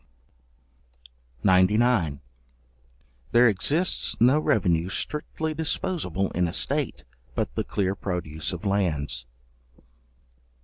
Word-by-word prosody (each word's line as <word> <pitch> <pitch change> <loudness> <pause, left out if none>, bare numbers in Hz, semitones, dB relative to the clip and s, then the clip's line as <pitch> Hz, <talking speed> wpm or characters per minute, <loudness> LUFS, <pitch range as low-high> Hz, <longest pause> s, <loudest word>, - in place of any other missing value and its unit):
§99. 95 - +3 1.1
There 120 +1 +7
exists 145 - +1
no 130 +6 +5
revenue 90 - +1
strictly 155 +7 -3
disposable 155 - -2
in 90 0 +1
a 85 - -5
state, 70 - -1 0.3
but - - -2
the - - -1
clear 95 -2 -1
produce 80 -6 -4
of 90 +4 -6
lands. 75 -11 -1
95 Hz, 90 wpm, -25 LUFS, 85-125 Hz, 1.1 s, There